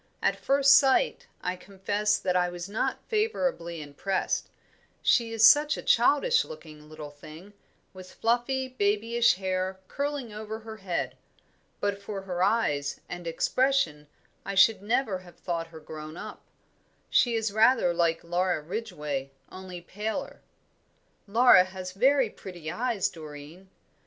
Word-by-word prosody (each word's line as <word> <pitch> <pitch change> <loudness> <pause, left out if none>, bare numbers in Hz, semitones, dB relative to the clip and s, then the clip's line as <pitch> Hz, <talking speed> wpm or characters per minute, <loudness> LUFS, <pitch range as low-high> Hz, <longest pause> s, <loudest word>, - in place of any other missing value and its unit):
At - - +1
first 275 0 +5
sight 270 - +3 0.2
I 180 +1 -1
confess 205 +3 -1
that 180 -1 -1
I 180 0 +2
was 175 0 -6
not 205 +2 -2
favourably 270 - -1
impressed 150 +7 -2 0.5
she 230 -2 +3
is 225 0 +7
such 295 +1 +5
a - - -7
childish 290 - +4
looking 155 - -12
little 155 -1 -9
thing, 155 +7 -13 0.4
with 185 -1 -12
fluffy, 245 +3 0
babyish 230 -1 +2
hair 185 0 -2
curling 280 -5 -3
over 215 +1 -6
her 220 0 -9
head. 190 -4 -3 0.6
But 200 -1 -2
for 200 -1 -5
her 180 -2 -4
eyes, 185 -9 +1
and 175 -1 -7
expression, 165 - +1 0.4
I 200 - -5
should 195 +2 +5
never 215 -2 0
have 180 -1 -16
thought 170 -2 -3
her 165 -1 -12
grown 155 +1 -9
up. - - -8 0.7
She 240 -2 +3
is 220 -2 -1
rather 220 -4 +4
like 170 -1 +1
Laura 175 0 0
Ridgway, 150 -6 -4 0.2
only 185 -1 -8
paler." 210 +5 -5 0.9
"Laura 230 -2 +7
has 185 0 -7
very 255 +3 +3
pretty 175 -5 -8
eyes, 220 0 0
Doreen." 155 +1 -11
195 Hz, 135 wpm, -27 LUFS, 175-230 Hz, 0.9 s, is